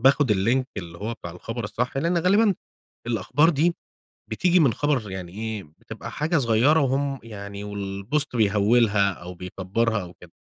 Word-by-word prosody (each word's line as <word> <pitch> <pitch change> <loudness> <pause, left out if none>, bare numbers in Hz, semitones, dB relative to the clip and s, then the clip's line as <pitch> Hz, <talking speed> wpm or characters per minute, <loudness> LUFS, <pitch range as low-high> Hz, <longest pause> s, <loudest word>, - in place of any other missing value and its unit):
باخُد 135 0 +4
اللينك 120 +7 +2
اللي 85 -3 -7
هو 115 +3 -3
بتاع 85 - -8
الخبر 115 +5 -6
الصح 125 +5 -2
لإن 170 +5 +1
غالبًا 200 +3 +4 0.5
الأخبار 120 - +2
دي 170 +3 +1 0.6
بتيجي 180 +10 +3
من 135 -8 +4
خبر 135 -9 0
يعني 90 -2 -6
إيه، 110 -1 -4 0.2
بتبقى - - -8
حاجة 160 +3 0
صغيرة 130 +5 +4
وهم 135 0 0
يعني 100 -2 -8
والبوست 100 +8 -2
بيهوِّلها 105 -1 +3
أو 90 +1 -9
بيكبَّرها 95 +5 -1
أو 90 - -10
كده. - - -16
115 Hz, 155 wpm, -24 LUFS, 100-140 Hz, 0.6 s, باخُد